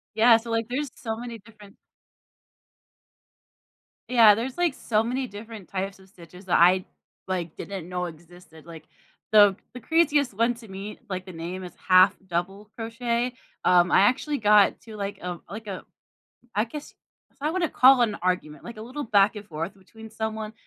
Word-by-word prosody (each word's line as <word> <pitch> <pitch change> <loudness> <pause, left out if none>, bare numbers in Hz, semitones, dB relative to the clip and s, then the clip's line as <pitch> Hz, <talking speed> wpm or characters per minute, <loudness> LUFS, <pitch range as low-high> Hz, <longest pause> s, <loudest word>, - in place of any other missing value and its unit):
Yeah 230 +1 +7
so, 230 +1 -6
like, 225 0 0
there's 270 +3 -3
so 225 -3 -5
many 235 0 -7
different 210 -1 -17 2.3
Yeah, 230 -4 +7
there's, 245 +4 -4
like, 350 -3 +1
so 215 -4 0
many 255 +3 -2
different 215 -2 -10
types 195 0 -4
of 190 0 -19
stitches 180 +1 -15
that 175 - +3
I, 180 +2 +5 0.4
like, 175 -4 -3
didn't 190 -4 -7
know 180 0 -3
existed, 170 -1 -14
like, 165 -2 -11 0.4
the 205 -2 +7 0.2
the 250 - -8
craziest 295 -1 +2
one 230 +4 +1
to 235 -1 -14
me 195 +2 -8
like, 185 0 -4
the 185 - -9
name 175 +3 -6
is 180 - -8
1/2 185 +1 +6
double 190 +4 -4
crochet. 235 +2 -2 0.3
Um, 175 -1 +4
I - - +6
actually 255 +8 +2
got 210 -3 +4
to, 220 -2 -11
like, 200 -1 -4
um 180 -1 -5
like 215 +2 -8
a 195 -2 -6 0.7
I 210 +2 +2
guess 290 +5 -9 0.5
y 295 - 0
I - - 0
wanna 340 -3 -1
call 260 0 +6
an 215 -3 0
argument 170 -5 -2
like, 235 - -9
a 215 - -8
little 265 +6 -6
back 205 -1 +3
and 205 0 -8
forth 165 +1 -5
between 220 +3 -14
someone. 220 -1 -4
210 Hz, 175 wpm, -25 LUFS, 185-235 Hz, 2.3 s, Yeah